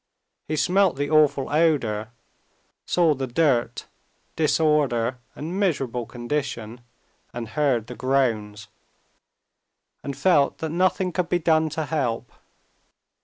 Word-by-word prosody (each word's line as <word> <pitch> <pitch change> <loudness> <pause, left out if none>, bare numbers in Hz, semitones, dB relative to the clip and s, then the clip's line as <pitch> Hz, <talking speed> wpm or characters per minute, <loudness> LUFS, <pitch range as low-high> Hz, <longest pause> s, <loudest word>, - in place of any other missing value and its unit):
He 155 - -1
smelt 180 +5 +2
the 145 +2 -3
awful 150 -3 +3
odor, 120 -10 +1 0.8
saw 170 -3 +3
the 135 -1 -4
dirt, 120 -3 +1 0.5
disorder, 145 -6 +1 0.2
and 170 +6 -5
miserable 135 - -1
condition, 120 -2 -4 0.5
and 115 -2 -5
heard 130 -4 +1
the 125 - -8
groans, 115 -6 -1 1.4
and 140 -1 -5
felt 145 -3 +3
that 160 -1 -4
nothing 185 +2 +1
could 180 -1 -2
be 175 - +2
done 160 -2 +2
to 160 - -1
help. 135 -7 -2
145 Hz, 115 wpm, -24 LUFS, 120-160 Hz, 1.4 s, awful